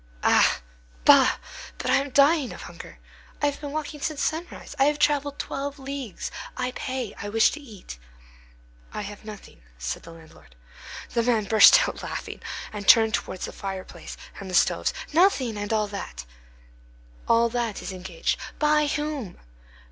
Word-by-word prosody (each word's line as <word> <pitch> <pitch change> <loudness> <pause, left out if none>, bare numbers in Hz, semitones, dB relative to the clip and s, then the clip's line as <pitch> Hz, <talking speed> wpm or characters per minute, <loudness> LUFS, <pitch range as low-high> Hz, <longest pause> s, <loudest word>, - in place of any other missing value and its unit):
"Ah! - - +4 0.4
bah! - - +7 0.4
But - - -1
I - - +6
am 280 +1 -1
dying 280 0 +4
of - - -9
hunger. 170 - -11 0.4
I - - +1
have 285 0 -1
been 290 -1 -5
walking 300 0 -4
since 300 -1 -2
sunrise. 320 -2 -4
I 270 - +6
have 295 +1 +2
travelled 285 -1 +1
twelve 280 +1 -4
leagues. 270 -5 -6 0.3
I 250 0 -1
pay. 255 -4 -4
I 205 - -4
wish 225 +1 +4
to 305 - -6
eat." 210 - -11 0.9
"I - - -3
have 205 +1 -9
nothing," 210 - -11 0.2
said - - -4
the 165 - -12
landlord. 160 - -16 0.6
The 235 - +1
man 230 -2 +2
burst 225 - +7
out - - -6
laughing, - - -6 0.3
and 205 -2 -6
turned 220 -1 +7
towards 185 - -2
the - - -7
fireplace 190 -1 -7 0.2
and 195 - -7
the 185 - -2
stoves: - - +3 0.2
"Nothing! 305 - +3
and 205 +1 -4
all 215 -1 +2
that?" 65 - -6 1.0
"All 230 0 +4
that 235 -3 -2
is - - -5
engaged." 185 +2 -2 0.2
"By 300 0 +3
whom?" 295 - -3
235 Hz, 165 wpm, -25 LUFS, 200-285 Hz, 1.0 s, bah